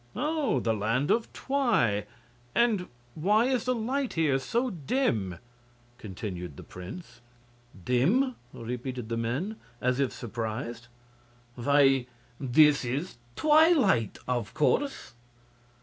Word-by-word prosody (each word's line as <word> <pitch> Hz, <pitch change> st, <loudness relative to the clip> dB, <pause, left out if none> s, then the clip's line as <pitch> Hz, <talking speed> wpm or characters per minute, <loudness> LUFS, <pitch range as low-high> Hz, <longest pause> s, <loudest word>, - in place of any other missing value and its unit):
"Oh! 300 Hz, -, 0 dB
the 115 Hz, -2 st, 0 dB
Land 115 Hz, +6 st, 0 dB
of 230 Hz, 0 st, +1 dB
Twi. 215 Hz, -, +1 dB, 0.5 s
And 220 Hz, -6 st, +2 dB, 0.3 s
why 205 Hz, -, +3 dB
is 255 Hz, -2 st, 0 dB
the 255 Hz, 0 st, +1 dB
light 255 Hz, +4 st, -1 dB
here 150 Hz, -5 st, +2 dB
so 235 Hz, -, -1 dB
dim?" 135 Hz, -, -1 dB, 0.6 s
continued 90 Hz, -6 st, -6 dB
the -, -, -9 dB
prince. 110 Hz, -, -10 dB, 0.6 s
"Dim?" 195 Hz, -, +2 dB, 0.2 s
repeated 125 Hz, 0 st, -5 dB
the 115 Hz, -, -1 dB
men, 135 Hz, -, -2 dB, 0.2 s
as 125 Hz, +1 st, 0 dB
if 135 Hz, -2 st, +1 dB
surprised; 115 Hz, +1 st, -5 dB, 0.7 s
"why, 135 Hz, 0 st, +3 dB, 0.3 s
this 145 Hz, +2 st, +4 dB
is 135 Hz, +6 st, -3 dB, 0.2 s
twilight, 300 Hz, -, +4 dB
of 120 Hz, -5 st, -2 dB
course." 275 Hz, -, 0 dB
135 Hz, 110 wpm, -28 LUFS, -, 0.7 s, this